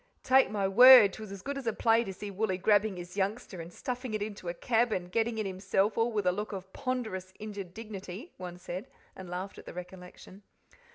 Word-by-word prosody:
"Take 265 -2 +5
my 200 -2 0
word, 245 0 +9
'twas 215 -2 -8
as 195 -2 -8
good 280 0 -3
as 260 - -8
a 225 - +1
play 225 +1 +3
to 195 - -5
see 200 +2 -7
Wooly 195 -1 -1
grabbing 205 0 +2
his 175 +1 -8
youngster, 200 -2 -2
and 165 +1 -9
stuffing 250 0 -4
it 210 - -1
into 205 -4 -6
a - - -2
cab, 235 +5 +1
and 180 -3 -3
getting 225 +2 0
in 215 - -1
himself, 195 +2 0
all 230 +1 +1
with 210 -3 -1
a 180 - +4
look 210 +3 -4
of 190 -1 -8
ponderous 220 -8 -4
injured 205 -4 -7
dignity," 210 - -8
one 180 -1 -7
said, 180 +2 -6 0.3
and 185 -2 -9
laughed 185 +3 -5
at - - -14
the - - -9
recollection. 180 +2 -10
200 Hz, 220 wpm, -30 LUFS, 185-225 Hz, 0.3 s, word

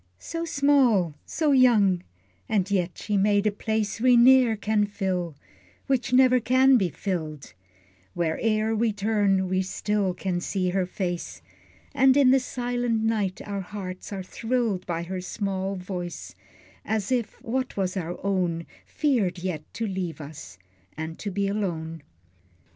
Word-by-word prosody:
So 330 - -5
small, 275 - +3
so 310 -3 +1
young, 220 -9 +4 0.5
and 200 -2 0
yet 180 -3 0
she 210 -1 -1
made 205 +1 +3
a 210 - +3
place 220 +1 -2
We 250 -1 +6
ne'er 250 -1 +6
can 210 0 +1
fill, 185 -5 -2 0.5
which 260 -3 0
never 255 0 +5
can 260 +3 +4
be 195 -7 +2
filled; 155 -3 -5 0.6
Where 165 -2 -1
e'er 220 0 +1
we 220 0 +1
turn, 200 -2 +1
we 185 +1 +1
still 195 0 -1
can 180 -1 -2
see 185 0 -1
her 185 -1 0
face, 175 - -4 0.5
And 265 +1 +5
in 270 -3 +6
the 265 - +5
silent 245 -3 -2
night 210 -4 -1
our 200 -1 -3
hearts 185 -1 -7
are 195 -2 -4
thrilled 225 -2 -2
By 170 -1 -2
her 185 +1 -4
small 195 0 -3
voice, 180 -1 -6 0.5
as 220 0 -2
if 240 -4 -1
what 255 +1 -2
was 185 -1 -1
our 175 -2 -3
own 175 -4 0 0.2
Feared 230 - 0
yet 170 -4 -5
to 230 - -2
leave 185 -5 -4
us, 140 - -10 0.4
and 160 +1 -5
to 205 - -4
be 200 +1 -1
alone. 165 -6 -3
200 Hz, 150 wpm, -26 LUFS, 180-230 Hz, 0.6 s, We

